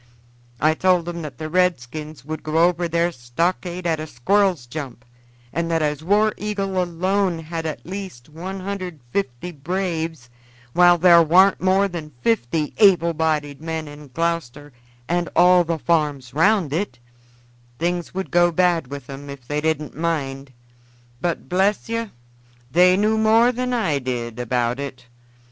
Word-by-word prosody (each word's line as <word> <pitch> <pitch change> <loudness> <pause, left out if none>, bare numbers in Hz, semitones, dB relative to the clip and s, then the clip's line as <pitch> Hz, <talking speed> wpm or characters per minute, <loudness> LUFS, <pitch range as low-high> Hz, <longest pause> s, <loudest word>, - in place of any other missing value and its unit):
I 155 +2 +3
told 180 0 +2
'em 170 -1 -4
that 145 -6 -8
the 155 - -5
redskins 155 -4 -1
would 155 +1 -5
go 160 +2 +3
over 175 -1 -1
their 170 +1 +1
stockade 170 +7 -2
at 160 -2 +1
a 155 - -5
squirrel's 180 - +1
jump, 125 -2 -7 0.5
and 170 +2 -1
that 165 -1 +1
as 150 0 -1
War 210 +4 +3
Eagle 195 -3 -2
alone 180 +1 0
had 165 0 -5
at 155 - -6
least 185 -10 -7
150 180 -4 -5
braves, 165 -3 -3 0.5
while 175 0 +6
there 170 0 +7
warn't 185 +4 +5
more 190 +2 +3
than 160 -5 -7
50 120 +7 0
able 175 -5 +5
bodied 150 -3 -1
men 160 -1 -4
in 145 0 -11
Gloucester 145 -2 -3 0.3
and 175 0 0
all 180 0 +6
the 165 -1 -2
farms 150 -6 0
around 170 -1 +2
it, 165 -7 -2 0.8
things 175 +1 -2
would 190 0 -5
go 175 0 +4
bad 170 -3 +2
with 140 -1 -8
'em 140 +1 -9
if 135 -3 -10
they 150 0 -1
didn't 155 -1 -1
mind. 140 -4 -3 0.7
But 175 -1 -2
bless 195 +4 +1
yer, 230 -1 -2 0.6
they 180 +3 +5
knew 215 +2 +2
more 225 +3 +5
than 250 +1 -3
I 215 - +1
did 120 -3 -4
about 125 +1 -1
it. 140 -3 -6
165 Hz, 150 wpm, -22 LUFS, 145-180 Hz, 0.8 s, there